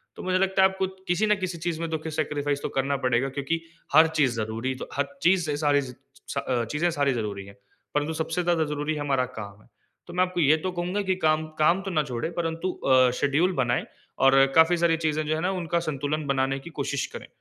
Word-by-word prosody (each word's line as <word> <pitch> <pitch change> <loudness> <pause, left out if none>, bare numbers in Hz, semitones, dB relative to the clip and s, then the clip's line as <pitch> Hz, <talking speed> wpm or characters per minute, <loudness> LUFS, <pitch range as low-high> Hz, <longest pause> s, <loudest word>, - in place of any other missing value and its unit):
तो - - -8
मुझे 185 0 +1
लगता 190 0 +3
है 190 - +6
आपको 190 0 -2 0.2
किसी 180 +4 +2
न 210 - +4
किसी 185 -2 -3
चीज़ 165 0 -3
में 165 - -2
तो 160 0 -3
सैक्रिफाइस 145 -2 -2
तो - - -3
करना 140 +1 0
पड़ेगा 125 +2 +2
क्योंकि 140 +5 -2 0.3
हर 160 +2 +8
चीज़ 130 -5 +3
ज़रूरी 115 +3 -2
तो - - -7
हर 140 0 0
चीज़ 180 -1 +3
से 145 -2 -2
सारी 145 -1 +3
अ, 130 -2 -4
चीज़ें 165 +4 +1
सारी 140 -3 +1
ज़रूरी 105 -4 -4
है। 100 - -13 0.4
परंतु 150 +2 0
सबसे 160 +2 -2
ज़्यादा 170 -2 +2
ज़रूरी 150 +1 -2
है 150 - -4
हमारा 135 -3 +1
काम 100 -1 -9
है। - - -23 0.4
तो 175 - -9
मैं 180 +1 +3
आपको 180 -1 -2
ये 155 +1 +5
तो 185 +4 -3
कहूँगा 180 +3 -2
की 185 - +3
काम 155 0 +2
काम 170 +5 +4
तो 195 0 -5
ना 155 -3 +2
छोड़े, 130 +2 -3
परंतु 165 +2 -2
अ, 130 -5 +3
शेड्यूल 150 +6 +2
बनाए 120 -1 0 0.4
और 135 0 +7
काफ़ी 160 +2 +6
सारी 170 -1 +2
चीज़ें 155 -1 -1
जो 155 - +1
है - - -2
ना 180 - +1
उनका 170 -3 -1
संतुलन 150 -1 -2
बनाने 135 0 0
की 155 - -10
कोशिश 140 -1 -1
करें। - - -8
155 Hz, 225 wpm, -26 LUFS, 135-170 Hz, 0.4 s, हर